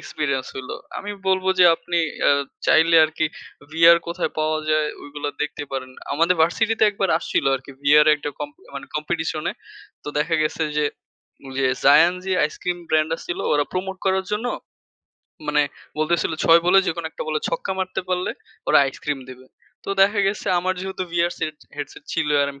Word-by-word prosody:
Experience 140 -4 -2
হইল। 130 -1 -7 0.3
আমি 205 - -6 0.2
বলব 190 0 +2
যে 180 - +7
আপনি 175 +1 -2 0.3
আ - - +6 0.4
চাইলে 165 +1 +5
আরকি 155 0 -1 0.5
ভিআর 165 +1 +7
কোথায় 175 +1 -2
পাওয়া 155 0 +1
যায় 155 -1 +2 0.2
ওগুলো 145 0 -5
দেখতে 150 0 -4
পারেন। 130 -1 -4 0.2
আমাদের 165 +5 +3
ভার্সিটিতে 220 +7 +2
একবার 195 -2 -1
আসছিল - - -1
আরকি 135 +1 -12
ভিআর 150 +2 +6
একটা 145 0 -5
কম্পি 295 +5 -7
মানে - - -7
কম্পিটিশন - - -2
এ। - - -6 0.5
তো - - -5
দেখা 155 +2 0
গেছে 155 +1 -1
যে, 150 - +2 1.0
Za 140 - +8 0.2
'n - - -7
Zee 190 -1 0
ice cream 175 +4 -3
brand 155 0 +2
আছিলো 175 - -5
ওরা 145 -1 +3
প্রমোট 190 +1 -3
করার 190 0 +2
জন্য। 210 +4 -1 1.0
মানে 150 0 +3 0.4
বলতেছিল 160 +1 +1
৬ 165 +1 +7
বলে 185 +2 +6
যে - - +1
কোনো 170 -1 -4
১ - - -39
টা - - -3
বলে 155 -1 -1
ছক্কা 190 - -2
মারতে 185 0 -2
পারলে 180 0 -1 0.4
ওরা - - +6
আইসক্রিম 140 +1 -4
দিবে। 130 0 -13 0.4
তো - - -4
দেখা 205 +1 +3
গেছে 200 +2 -2
আমার 185 +1 0
যেহেতু 190 0 -4
ভিআরস 175 0 0
সেট 155 -1 -3 0.2
হেডসেট 145 0 -7
ছিল, - - 0
আর - - +1
আমি 140 - -16
165 Hz, 180 wpm, -22 LUFS, 150-185 Hz, 1.0 s, Za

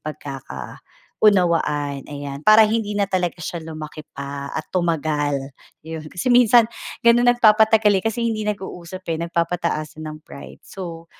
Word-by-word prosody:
pagkakaunawaan, 145 - -1
ayan. 140 -1 -6
Para 215 +1 +8
hindi 220 -2 -1
na 200 - +3
talaga 180 -3 -1
siya 170 +1 -5
lumaki 155 -1 -8
pa 140 0 -6
at 155 - -3
tumagal, 155 -5 0 0.5
yun 160 -1 -7
kasi 180 +10 -3
minsan 240 -1 +6 0.4
ganun 240 +1 +5
nagpapatagal, 220 -2 +5
eh, - - -23
kasi 230 +1 -1
hindi 215 -2 -1
nag-uusap, 185 -2 -6
eh, 160 - -4
nagpapataasan 170 -2 -2
ng 155 0 -7
pride. 140 - -12
So 170 -3 -8
170 Hz, 135 wpm, -21 LUFS, 150-210 Hz, 0.5 s, Para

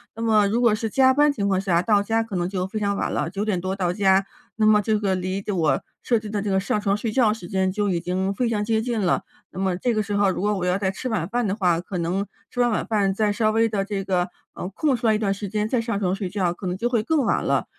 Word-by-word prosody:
那 225 - -7
么 215 -2 +4
如 225 +4 0
果 235 -3 +4
是 220 0 -3
加 260 +3 +4
班 295 +2 +4
情 200 -7 -2
况 190 -1 +1
下， 175 -3 +2
到 205 -1 +2
家 225 +2 +1
可 225 -3 -5
能 175 0 -1
就 185 -1 -2
非 215 - -6
常 200 0 0
晚 - - -1
了， - - -1
9 200 +2 -3
点 185 -5 -1
多 185 +1 -2
到 180 -2 0
家， 190 -1 +3 0.3
那 220 - +2
么 210 -1 +5
这 215 0 +1
个 195 -2 0
离 185 +2 -3
我 160 -8 +1 0.2
设 235 -3 +2
置 215 -1 -8
的 205 -1 -2
这 205 - -2
个 190 - +3
上 200 +2 -1
床 200 -1 +1
睡 220 +2 -3
觉 225 -4 +3
时 220 -6 -9
间， 190 0 0
就 205 +1 -1
已 175 -2 0
经 190 +3 -1
非 240 +2 0
常 210 -2 -1
接 220 -1 +1
近 235 -2 -2
了， 180 -3 +1 0.3
那 185 - -8
么 185 -2 0
这 240 +4 0
个 215 -1 0
时 205 - -4
候 200 -1 +3
如 185 - -2
果 210 +1 +1
我 180 - -2
要 180 +1 +1
再 190 -2 0
吃 225 +6 -6
晚 200 -8 -2
饭 240 0 0
的 195 - -1
话， 180 -5 +2
可 180 +1 -6
能 180 +4 -1 0.3
吃 245 - -6
完 245 - +4
晚 220 - -1
饭， 200 -3 +1
再 210 +1 +1
稍 215 0 +1
微 225 +1 +2
地 200 -2 -1
这 200 -1 -3
个， 180 -2 0 0.3
呃， - - -5
空 280 +8 0
出 235 - -1
来 220 - +4
一 215 - +2
段 200 -2 0
时 200 +1 -5
间 210 +2 -2
再 250 - +1
上 230 -2 -2
床 185 -2 +1
睡 195 -1 -3
觉， 180 -3 0
可 185 +1 -7
能 180 - -1
就 235 +6 -1
会 235 -3 +1
更 290 +4 +1
晚 - - +1
了。 - - 0
205 Hz, 325 characters per minute, -23 LUFS, 190-220 Hz, 0.3 s, 么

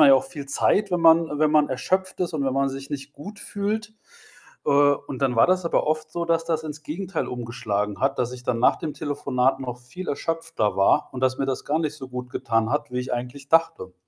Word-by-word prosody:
man 150 - +9
ja 135 - +9
auch 130 - +2
viel 145 -5 -7
Zeit, 200 +8 +2
wenn 175 -1 +1
man 165 -2 +5
wenn 155 -1 +3
man 150 -1 +4
erschöpft 185 +9 -1
ist 175 -2 0
und 145 -3 0
wenn 135 - 0
man 135 +1 +1
sich 135 0 -7
nicht 140 0 -5
gut 205 +9 -10
fühlt. 215 +2 -3 0.7
Äh, - - +3
und 145 -1 +2
dann 130 -3 +1
war 115 - +6
das 185 -1 +2
aber 170 - +1
oft 155 0 -1
so, 170 +1 -2
dass 165 -1 +1
das 160 -1 -1
ins 155 0 -7
Gegenteil 170 +3 -3
umgeschlagen 115 -4 -3
hat, 135 +1 +1
dass 125 0 0
ich 125 -1 -8
dann 125 -2 0
nach 125 - +5
dem 155 -3 -4
Telefonat 135 -3 0
noch 125 -2 -5
viel 125 +10 -8
erschöpfter 165 -7 -1
war 145 +10 +3
und 130 - -6
dass 130 0 +2
mir 135 - 0
das 135 -1 -2
gar 155 +2 +1
nicht 155 -2 -2
so 135 -3 -8
gutgetan 125 -3 -1
hat, 145 -1 -1
wie 125 - -2
ich 125 - -5
eigentlich 125 +3 -5
dachte. 165 - +2
145 Hz, 235 wpm, -24 LUFS, 130-165 Hz, 0.7 s, man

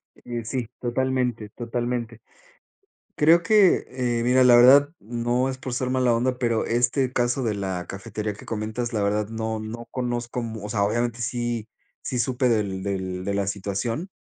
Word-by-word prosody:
Eh, 120 -1 -6
sí, 120 -1 -3
totalmente, 125 -3 -1
totalmente. 120 0 -4 1.0
Creo 165 +3 +5
que, 205 0 +4
eh, 125 -2 -1
mira, 130 +1 +4
la 120 -1 +8
verdad, 140 +4 +7
no 120 +3 -1
es 130 - -4
por 130 -2 -5
ser 125 0 -1
mala 130 -2 +2
onda, 125 +2 0
pero 115 -3 +1
este 125 +2 +1
caso 120 +2 0
de 110 -3 0
la 95 -3 -3
cafetería 105 +2 -4
que 105 - -13
comentas, 110 +2 -3
la 105 - 0
verdad 105 +1 0
no 110 0 -3
no 115 +2 -7
conozco 120 -1 -3
mu 110 -2 -6
o 105 - -5
sea, 100 -1 +1
obviamente 120 +3 -1
sí 120 -2 -2 0.3
sí, 125 - -3
supe 125 +2 +1
del 100 -4 0
del 95 -2 -3
de 100 - -1
la 100 0 0
situación. 100 - -3
120 Hz, 175 wpm, -24 LUFS, 110-125 Hz, 1.0 s, la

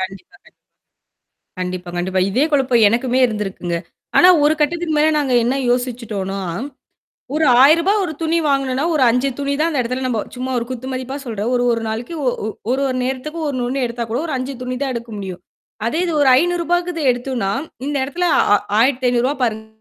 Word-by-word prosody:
கண்டிப்பா 195 - -7
கண்டிப் - - -21 1.1
கண்டிப்பா, 180 -1 -4
கண்டிப்பா. 185 +1 0
இதே 255 +9 +2
குழப்பம் 255 -5 +3
எனக்குமே 245 +3 0
இருந்திருக்குங்க. 195 -6 -3 0.4
ஆனா 360 - +8 0.2
ஒரு 305 +1 +4
கட்டத்துக்கு 325 +2 0
மேல 305 - +4
நாங்க 275 -3 0
என்ன 250 +3 +1 0.2
யோசிச்சுட்டோனா, 230 -6 -2 0.9
ஒரு 315 - +2 0.2
ரூ.1000 335 +7 +5
ஒரு 320 - -3
துணி 325 +1 +1
வாங்குனோனா, 275 0 0
ஒரு 295 - +2
5 250 +4 +1
துணி 280 0 -1
தான் 330 +2 +2
அந்த 285 -5 0
இடத்துல 255 +2 -3
நம்ப 230 -4 0 0.2
சும்மா 255 +1 -4
ஒரு 235 - -3
குத்துமதிப்பா 260 +1 -5
சொல்ற. 220 -4 -4
ஒரு 245 0 +1
ஒரு 230 - -1
நாளைக்கு 230 +9 -4
ஒ - - +4 0.2
ஒ - - -1 0.2
ஒரு 265 +2 +1
ஒரு 255 - -2
நேரத்துக்கு 270 +6 -4
ஒண்ணு 255 -3 -2
ஒண்ணு 270 +1 -1
எடுத்தா 235 0 -4
கூட 235 - -1
ஒரு 315 - -4
5 255 +2 -3
துணி 255 0 -3
தான் 270 -2 -1
எடுக்க 235 0 -6
முடியும். 185 -3 -6 0.5
அதே 310 - -1
இது 340 - -1
ஒரு 285 - +4
ரூ.500க்கு 350 0 0
எடுத்தோனா, 245 -4 -2 0.4
இந்த 290 -1 -1
இடத்துல 345 +6 -2 0.5
ரூ.1500 250 -1 +2
ஆ - - -5
பாருங்க. 220 -2 -1
255 Hz, 180 wpm, -19 LUFS, 230-290 Hz, 1.1 s, ஆனா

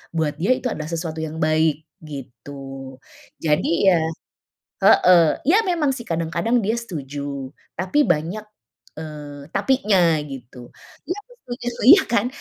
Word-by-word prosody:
buat 155 -2 -1
dia 235 +9 +3
itu 255 -2 -3
adalah 155 0 -5
sesuatu 165 -1 -4
yang 160 0 -4
baik, 155 -1 +2 0.2
gitu. 135 -2 -9 0.5
Jadi 165 +4 +3
ya 175 - +4 0.8
heeh, 180 -2 +6 0.2
ya 320 +8 +4
memang 320 -6 +1
sih 245 -3 -7
kadang-kadang 170 +8 0
dia 215 - +1
setuju, 140 - -6 0.2
tapi 185 - -1
banyak, 170 +8 0 0.5
eee, 150 -2 -8
tapinya 200 -11 +3
gitu. 125 -3 -10 0.3
Iya, 355 +5 -3
aku - - -21
setuju, 245 0 -7 0.2
iya 385 +4 +9
kan? 230 -1 +2
160 Hz, 130 wpm, -22 LUFS, 145-215 Hz, 0.8 s, iya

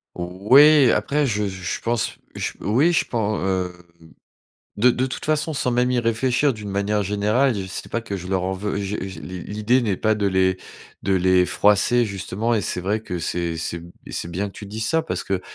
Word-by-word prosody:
Oui, 125 - +5
après 150 +1 +1
je 105 -3 -1
je 95 -1 -7
je - - -8
pense, 115 0 -1 0.2
je - - -3
oui, 130 - +3
je 170 - +2
pen 110 -3 -1
hem, 95 -2 -1 1.1
de 120 +5 +5
de 125 +2 0
toute 130 - -6
façon 155 +1 0
sans 130 - 0
même 125 +1 +2
y 125 -1 +2
réfléchir 125 +4 +1
d'une 105 -3 -8
manière 100 +1 0
générale, 105 +6 +1
j 95 -2 -4
c'est 95 - -6
pas 115 - -1
que 100 -3 -4
je 90 -1 -7
leur 95 -1 0
en 95 +1 -1
veux 100 +2 -3
je 100 +1 -2
je 95 0 -7
l'i 90 0 -7
l'idée 105 +5 +1
n'est 105 -6 0
pas 110 +3 +1
de 105 -1 -1
les 95 -1 +2 0.4
de 95 - +1
les 90 0 +3
froisser, 105 +6 +3
justement 105 +3 -2
et 110 - +1
c'est 90 - -2
vrai 100 +4 -1
que 90 -5 -5
c'est 85 0 -2
c'est 80 +1 -3
b 85 +1 -13 0.2
et - - -9
c'est 85 - -4
bien 95 +4 -2
que - - -14
tu 105 - -9
dises 110 +2 -4
ça 160 - +2
parce 160 - -3
que 95 -2 -1
105 Hz, 225 wpm, -22 LUFS, 95-120 Hz, 1.1 s, Oui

